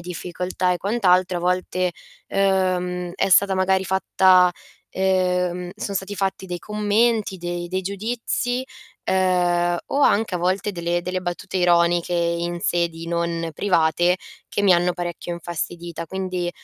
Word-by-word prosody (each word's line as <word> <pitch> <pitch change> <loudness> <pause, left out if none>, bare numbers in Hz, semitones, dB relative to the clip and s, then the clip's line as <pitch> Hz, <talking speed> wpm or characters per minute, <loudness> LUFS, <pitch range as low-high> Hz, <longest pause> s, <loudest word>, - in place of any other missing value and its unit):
difficoltà 180 +1 -2
e - - 0
quant'altro, 185 -3 +2
a - - -2
volte, 180 0 0 0.3
ehm, 180 -2 0
è 195 - 0
stata 195 +1 +5
magari 190 0 +2
fatta 185 -1 +4 0.4
ehm, 180 -1 0
son 200 -1 -4
stati 195 +1 -3
fatti 190 0 -2
dei 175 -1 -4
commenti, 210 +1 0
dei 175 0 -4
dei 185 +1 -1
giudizi, 230 +5 -2 0.4
ehm, 175 -2 +2
o 280 - -1
anche 215 -6 +3
a - - 0
volte 185 +4 0
delle 175 -2 -1
delle 180 +1 -3
battute 180 +2 -4
ironiche 175 -1 +3
in 170 0 -1
sedi 170 -1 -1
non 170 -1 -1
private, 175 -1 +2 0.3
che - - -1
mi 195 -3 +5
hanno 175 +1 +2
parecchio 175 0 -5
infastidita. 170 0 -5
Quindi, 185 -1 -3
180 Hz, 135 wpm, -22 LUFS, 175-190 Hz, 0.4 s, stata